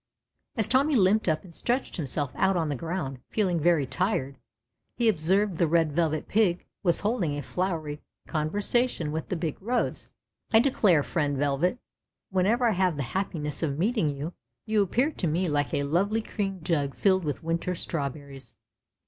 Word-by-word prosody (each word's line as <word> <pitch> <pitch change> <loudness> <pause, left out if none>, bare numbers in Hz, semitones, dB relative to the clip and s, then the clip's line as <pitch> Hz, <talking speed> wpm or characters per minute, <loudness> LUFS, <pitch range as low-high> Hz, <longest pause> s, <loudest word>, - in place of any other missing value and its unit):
As 220 - +1
Tommy 275 +3 +3
limj)ed 205 0 +4
up 155 -2 +1
and 180 -3 -14
stretched 245 +7 -1
himself 145 -3 -2
out 190 -1 +2
on 160 -3 0
the 145 - -1
ground 155 -3 -4
feeling 185 -6 +1
very 160 -3 +3
tired, 140 -5 -1 0.6
he 235 -1 +1
observed 190 0 +2
the 170 - +4
Red 165 -1 +2
Velvet 155 0 0
Pig 195 -5 +2 0.2
was 175 -3 +2
holding 195 -10 0
a 145 - -4
flowery 160 -5 -3 0.2
conversation 175 +3 0
with 160 +1 -4
the - - -1
big 165 -1 -3
rose. 240 +5 -1 0.4
declare, 220 - +4
friend 145 -3 -1
Velvet, 145 - +1 0.5
whenever 205 +7 +2
I 225 - +3
have 185 -3 +1
the 140 - -1
happiness 155 -7 -2
of 145 -4 -1
meeting 210 -1 +1
you, 145 +4 -4 0.3
you 215 -2 +2
appear 245 - +1
to 185 - -2
me 175 +4 +1
like 145 -2 0
a 140 - 0
lovely 200 +9 +1
cream 195 -4 -3
jug 145 -5 0
filled 190 -2 +3
with 150 +1 -3
winter 165 +2 -1
strawberries. 140 -5 -5
170 Hz, 165 wpm, -27 LUFS, 150-205 Hz, 0.6 s, limj)ed